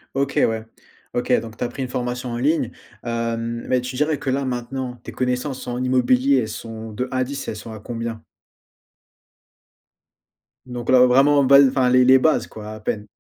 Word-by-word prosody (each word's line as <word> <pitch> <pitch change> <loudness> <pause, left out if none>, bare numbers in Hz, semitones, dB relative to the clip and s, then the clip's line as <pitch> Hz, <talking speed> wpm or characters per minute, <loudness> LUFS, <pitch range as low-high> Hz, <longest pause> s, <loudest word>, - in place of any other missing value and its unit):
OK, 140 0 -1
ouais. 110 0 -2 0.5
OK 120 +1 -2
donc, 115 -1 -10
tu - - -3
as - - 0
pris 135 - -7
une - - -3
formation 125 0 -3
en 120 - -3
ligne, 135 -2 +1 0.3
hem, 115 0 -3
mais 125 -1 +2
tu 125 +1 -6
dirais 150 +2 +1
que 135 - -3
là, 135 +1 0
maintenant, 125 0 -4
tes - - -8
connaissances 125 +1 -2
en 125 +1 -2
immobilier, 130 +1 +3
elles 110 -4 0
sont 110 0 -7
de 125 +4 -3
1 130 - -2
à 130 - +2
10, 140 +2 -6
elles - - -3
sont 110 +1 -9
à 110 - -8
combien? 115 0 -5 2.4
Donc 120 -1 -6
là 125 -1 +7
vraiment, 140 +3 +4
base 140 0 +7
enfin, 130 -1 +2
les 125 0 +5
les 130 0 +7
bases, 155 +4 +2
quoi, 110 0 -9
à 110 - -8
peine. 105 0 -3
125 Hz, 195 wpm, -22 LUFS, 115-130 Hz, 2.4 s, là